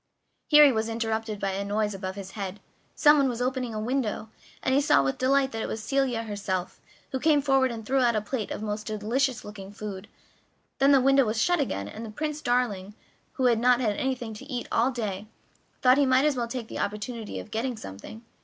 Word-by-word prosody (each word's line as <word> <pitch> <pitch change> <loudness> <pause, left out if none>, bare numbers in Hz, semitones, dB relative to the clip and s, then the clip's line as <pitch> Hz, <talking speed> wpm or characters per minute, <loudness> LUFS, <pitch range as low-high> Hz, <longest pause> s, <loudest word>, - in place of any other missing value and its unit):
Here 300 -1 +8
he 280 - +6
was 220 -1 -1
interrupted 225 -2 -2
by 195 -1 -1
a 195 +1 -2
noise 210 +1 -1
above 190 -1 -5
his 195 -1 -8
head 200 -1 -5 0.4
someone 295 -3 +5
was 240 -1 -4
opening 250 -2 -2
a - - -2
window, 225 -2 -2 0.3
and 260 - +1
he 275 - +4
saw 285 - +4
with 135 0 -2
delight 270 +1 +2
that 225 - -4
it - - -2
was 220 - -5
Celia 260 -2 0
herself, 200 -4 -4 0.3
who 265 - -2
came 300 +1 +4
forward 270 -2 +3
and 225 -2 -7
threw 270 +4 +1
out 240 -3 +3
a 215 - +1
plate 215 0 -4
of - - -5
most 210 0 -4
delicious 230 +5 -1
looking 200 -2 -9
food, 205 -1 -7 0.7
then 275 +1 +5
the 275 - +6
window 275 +1 +5
was 220 -1 -1
shut 355 +7 +2
again, 100 - -2
and 215 - -8
Prince 300 0 -3
Darling, 215 -6 -1 0.4
who 260 - -1
had 235 -2 +4
not 245 +1 +4
had 215 -5 0
anything 250 -3 -2
to 215 +5 -10
eat 245 -1 -3
all 235 +3 +3
day, 215 -5 -4 0.6
thought 255 +2 +6
he 280 - +4
might 260 +2 +4
as 300 -2 +2
well 240 -2 -2
take 235 -1 -5
the - - -6
opportunity 210 +2 -4
of - - -10
getting 235 +2 -2
something. 100 - -10
230 Hz, 220 wpm, -27 LUFS, 210-265 Hz, 0.7 s, Here